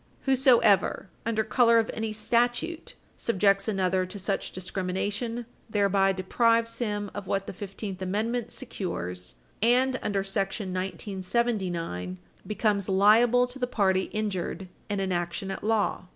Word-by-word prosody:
Whosoever 250 - +3 0.2
"under 220 -1 +1
color 230 +1 +4
of 225 -1 +2
any 220 -1 -2
statute" 240 +9 0 0.2
subjects 200 -2 +2
another 190 -3 +1
to 205 - -8
such 195 0 -2
discrimination 200 +6 -3 0.2
thereby 200 -2 +3
deprives 230 +4 +1
him 205 -4 -2
of 205 -2 -6
what 195 0 0
the - - -6
Fifteenth 195 0 -6
Amendment 220 +5 -1
secures 90 - -5 0.3
and, 255 +3 +3
under 200 -2 -1
§ 195 0 -8
1979, 190 - -2 0.3
becomes 210 -2 0
"liable 225 +6 +5
to 250 +2 -8
the 250 - 0
party 190 -5 +2
injured 195 -3 -3 0.2
in 205 -1 -1
an 190 -1 -1
action 175 +3 -2
at - - -6
law." 210 -3 0
205 Hz, 130 wpm, -27 LUFS, 190-230 Hz, 0.3 s, liable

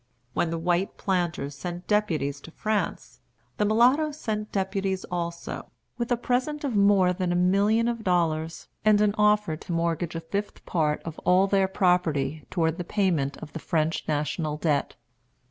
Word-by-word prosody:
When 170 - +1
the 165 - -2
white 175 +3 0
planters 175 -7 -1
sent 175 +6 -6
deputies 155 -10 0
to - - -11
France, 215 +5 -3 0.4
the 210 - +2
mulattoes 260 +8 +3
sent 215 -4 -3
deputies 195 -1 -1
also, 170 -1 -4 0.3
with 235 +1 -2
a 245 - +3
present 255 +5 -1
of 265 -6 -1
more 200 -3 +4
than 180 -1 -1
a - - +1
million 200 +6 +3
of 230 -2 -2
dollars, 165 -3 0 0.2
and 210 -1 +5
an 210 -1 +3
offer 210 -5 +3
to 175 - -9
mortgage 170 0 -1
a - - -1
fifth 200 +5 -5
part 150 -3 0
of 160 -1 -7
all 185 +2 +4
their 195 -1 +2
property 160 -6 +1
toward 165 -1 0
the - - -1
payment 170 -8 0
of - - -10
the 165 - -5
French 160 0 0
national 150 0 -1
debt. 150 -3 0
180 Hz, 165 wpm, -26 LUFS, 165-210 Hz, 0.4 s, and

